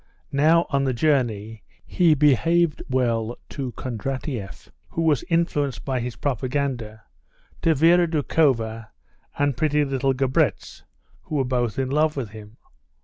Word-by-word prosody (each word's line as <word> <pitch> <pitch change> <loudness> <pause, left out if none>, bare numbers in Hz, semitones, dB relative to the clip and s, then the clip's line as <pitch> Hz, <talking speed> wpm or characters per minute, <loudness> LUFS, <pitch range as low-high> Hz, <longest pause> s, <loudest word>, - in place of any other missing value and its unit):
Now, 160 +4 +4
on 140 -1 +1
the 130 -2 0
journey 115 -6 0 0.2
he 170 -4 +3
behaved 150 +3 +3
well 120 -3 0
to 135 -4 -5
Kondratieff, 130 - -5 0.2
who 165 - -2
was 150 -6 +2
influenced 150 -5 0
by 130 -2 -1
his 120 0 -4
propaganda; 125 -5 -3 0.6
to 165 -1 +3
Vera 170 +4 +5
Doukhova 130 -8 0 0.5
and 145 -2 +1
pretty 150 +1 +1
little 135 -1 0
Grabetz, 130 0 0 0.4
who 155 - -5
were 135 -2 +1
both 120 -3 -1
in 135 -1 -1
love 150 +1 +1
with 120 -7 -4
him. 110 +1 -12
135 Hz, 135 wpm, -23 LUFS, 120-150 Hz, 0.6 s, Vera